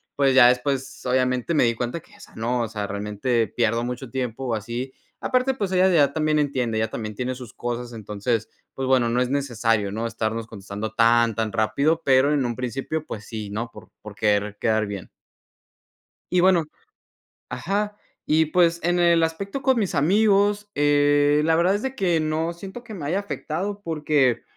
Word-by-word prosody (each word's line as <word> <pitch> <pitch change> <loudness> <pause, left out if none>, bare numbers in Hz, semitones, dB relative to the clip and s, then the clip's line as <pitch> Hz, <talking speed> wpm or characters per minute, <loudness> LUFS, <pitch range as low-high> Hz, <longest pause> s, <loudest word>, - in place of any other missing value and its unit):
pues 135 -1 +3
ya 125 -2 +8
después 130 +2 -1
obviamente 130 +3 +1
me 155 - +4
di 115 -1 +2
cuenta 120 +8 -3
que - - -21
esa - - -15
no, 120 +2 -1
o 115 - -1
sea, 105 -2 -4
realmente 105 +3 -1
pierdo 115 0 +1
mucho 125 +1 -5
tiempo 125 -1 -3
así. 120 +5 -4 0.3
Aparte, 255 +1 +1
pues 200 -7 -3
ella 185 +1 +4
ya 145 -6 +4
también 155 0 +1
entiende, 130 -6 0
ella 110 - 0
también 110 -1 -5
tiene 125 +3 -3
sus 125 -4 -10
cosas. 120 0 -4
Entonces, 110 +1 -2 0.2
pues, 135 -1 -3
bueno, 125 -3 +3
no 125 +2 +1
es 125 - 0
necesario, 115 -7 0
¿no? 115 +2 -2
Estarnos 115 0 -3
contestando 105 +1 -6
tan, 115 -1 +4
tan 110 -1 -1
rápido, 115 +9 +1
pero 135 +2 +4
en 140 -4 +1
un 120 -1 -2
principio, 135 +5 -3
pues, 105 - -7
sí, 110 -3 -6
¿no? 115 +3 -3
Por - - -14
por 105 -1 -10
querer 105 0 0
quedar 110 -1 +1
bien. 100 -3 -7 1.2
Y 180 - +3
bueno 175 -2 +4 0.8
Ajá. 200 +11 -2 0.3
Y, 155 +1 +4
pues, 170 +1 +2
en 175 +1 +1
el 170 -1 +4
aspecto 195 +10 -2
con 265 -2 +3
mis 200 -6 -1
amigos, 205 +5 +3
eh, 145 0 +3
la 160 0 +3
verdad 180 +4 +3
es 205 - -6
de 265 0 -3
que 175 -7 +1
no 155 +2 -1
siento 195 +7 -9
que 230 -2 -11
me 160 -8 -6
haya 185 +6 0
afectado 200 +1 -4
porque, 150 -6 +1
130 Hz, 185 wpm, -23 LUFS, 115-165 Hz, 1.2 s, ya